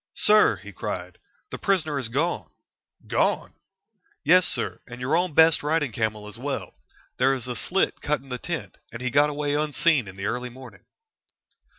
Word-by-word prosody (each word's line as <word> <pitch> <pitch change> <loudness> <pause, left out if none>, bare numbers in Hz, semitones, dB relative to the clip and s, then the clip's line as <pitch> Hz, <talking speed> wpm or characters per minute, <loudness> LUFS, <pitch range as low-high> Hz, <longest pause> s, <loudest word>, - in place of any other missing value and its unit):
"Sir," 210 - +5
he 105 +1 -11
cried, 95 - -6 0.3
"the - - -5
prisoner 160 -7 +1
is 120 -4 -1
gone!" 150 +8 -1 0.6
"Gone!" - - 0 0.7
"Yes, 180 +4 +6
sir, - - -1
and 125 0 -9
your 130 +5 0
own 175 -3 0
best 160 0 +6
riding 150 -3 0
camel 110 -1 -2
as 105 +2 -10
well. 140 +2 -4 0.5
There 135 +2 +4
is 125 -1 -5
a 125 - -4
slit 190 +10 0
cut 150 -2 0
in 135 +1 -17
the 125 -1 -4
tent, 170 +3 -5
and 115 - -7
he 125 - -1
got 145 +2 +4
away 145 0 -2
unseen 150 - +2
in 95 - -10
the 95 0 -5
early 125 +3 -2
morning." 125 -3 -13
140 Hz, 180 wpm, -25 LUFS, 120-155 Hz, 0.7 s, Yes